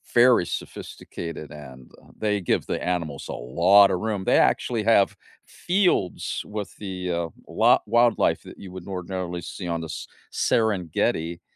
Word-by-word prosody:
very 120 -6 +6
sophisticated, 85 -3 -7
and, 65 -4 -12
uh, - - -21
they 105 -2 0
give 90 - 0
the - - -3
animals 85 -6 -3
a - - -5
lotta 95 +11 +4
room. 105 +1 -2
They - - +3
actually 115 -3 +1
have 105 -3 +4 0.3
fields 180 - 0
with 105 -1 -6
the, 95 -3 -4
uh, 85 -1 -1 0.2
la - - +4
wildlife 120 +1 +3
that - - -12
you 95 - -10
wouldn't 95 0 -9
ordinarily 90 -1 -4
see 90 +2 -7
on 85 -1 -2
this 80 0 -6 0.3
S - - 0
Serengeti, 85 -5 0
90 Hz, 150 wpm, -24 LUFS, 85-105 Hz, 0.3 s, very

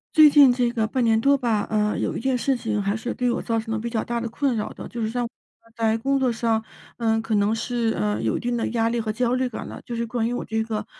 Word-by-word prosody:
最 310 -1 +9
近 280 -3 +7
这 245 -1 +1
个 225 -2 0
半 250 +3 0
年 225 -1 +3
多 280 +4 +4
吧， 230 -5 0
呃， 210 -1 +1
有 - - -1
一 - - -3
件 260 +1 +1
事 270 +2 +1
情， 220 -3 -2
还 200 +1 0
是 235 +2 -3
对 250 -1 0
我 235 - -1
造 225 -1 -1
成 225 0 -4
了 - - 0
比 235 - -3
较 225 -2 -1
大 235 0 -3
的 235 - -3
困 265 +2 0
扰 215 -1 -2
的， - - -9
就 235 - -6
是 220 - 0
像 245 +2 -1 0.4
呃， 230 - -22
在 225 -1 +1
工 275 +4 0
作 260 -2 +2
上， 225 -1 0 0.3
呃， 225 -1 +1
可 225 0 -3
能 205 +1 +2
是， 230 0 -1
呃， 105 +1 0
有 110 -1 0
一 - - -4
定 240 0 -2
的 230 - -1
压 225 -1 +1
力 235 0 0
和 215 -1 -2
焦 245 +2 0
虑 255 0 0
感 230 - -6
了。 - - -9
就 240 - -7
是 235 0 -1
关 230 0 -1
于 - - -2
我 245 - -3
这 220 0 -1
个 215 -1 -3
230 Hz, 320 characters per minute, -24 LUFS, 220-245 Hz, 0.4 s, 最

